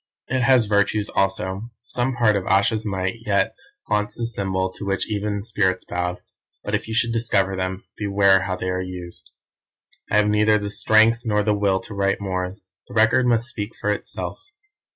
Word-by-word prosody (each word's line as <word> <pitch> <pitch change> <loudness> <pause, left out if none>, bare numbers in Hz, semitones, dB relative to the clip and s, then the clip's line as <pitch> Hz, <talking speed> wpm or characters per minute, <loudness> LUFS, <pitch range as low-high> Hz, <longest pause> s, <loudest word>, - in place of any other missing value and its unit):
"It 130 0 0
has 125 -2 +5
virtues 105 0 +1
also; 95 +2 -1
some 125 +1 -1
part 115 -3 +3
of 95 -2 -2
Ayesha's 105 +2 +2
might 95 +1 -2
yet 105 -3 +1 0.3
haunts 105 0 -1
the 120 - -2
symbol 95 -4 -1
to - - -9
which 100 0 -1
even 105 -1 -2
spirits 95 -4 0
bowed, 90 0 -3 0.4
but - - -5
if - - -1
you 110 - -4
should 115 0 +2
discover 100 -4 +1
them, 95 0 -3
beware 100 -2 +4
how 95 -1 -2
they 90 0 -3
are 90 0 -1
used. 90 -1 -8 0.8
"I - - 0
have 105 0 +4
neither 105 +1 +4
the 105 -1 -4
strength 110 +2 +4
nor 105 -2 +1
the 105 0 +2
will 100 -2 +1
to 110 - -9
write 100 0 0
more. 95 -1 -3 0.3
The 125 - -11
Record 115 +3 +4
must 115 -1 +2
speak 105 -2 -5
for 105 - 0
itself. 105 - -4
105 Hz, 185 wpm, -22 LUFS, 95-110 Hz, 0.8 s, has